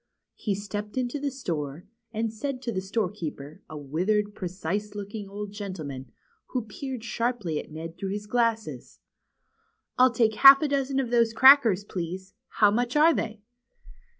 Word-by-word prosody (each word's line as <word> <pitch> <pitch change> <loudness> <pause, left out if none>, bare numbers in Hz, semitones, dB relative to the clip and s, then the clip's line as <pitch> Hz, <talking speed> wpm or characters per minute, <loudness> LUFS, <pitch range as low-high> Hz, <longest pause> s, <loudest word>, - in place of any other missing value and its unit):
He 205 -3 -2
stepped 205 +2 -6
into 255 +2 -1
the 285 0 -1
store, 165 - -5 0.3
and 225 0 -2
said 260 +3 -4
to 235 - -2
the 190 -3 -2
store 195 0 -1
keeper, 155 -6 -7
a 155 - -7
withered, 190 +9 -1
precise 195 +2 -4
looking 205 0 -6
old 205 0 -6
gentleman, 165 -10 -7 0.4
who 250 -3 -3
peered 255 +2 -6
sharply 230 -10 -2
at - - -9
Ned 165 +2 -8
through 195 - -3
his 205 +1 -4
glasses: 230 0 -1 1.0
I'll 255 +1 +7
take 230 -2 +2
half 275 +1 +9
a - - +2
dozen 275 -1 0
of 250 -3 -2
those 230 -2 +3
crackers, 245 -6 +7
please. 185 0 -6
How 210 -1 +3
much 245 +4 -1
are 315 +3 +6
they?" 220 -5 -4
210 Hz, 160 wpm, -26 LUFS, 185-245 Hz, 1.0 s, half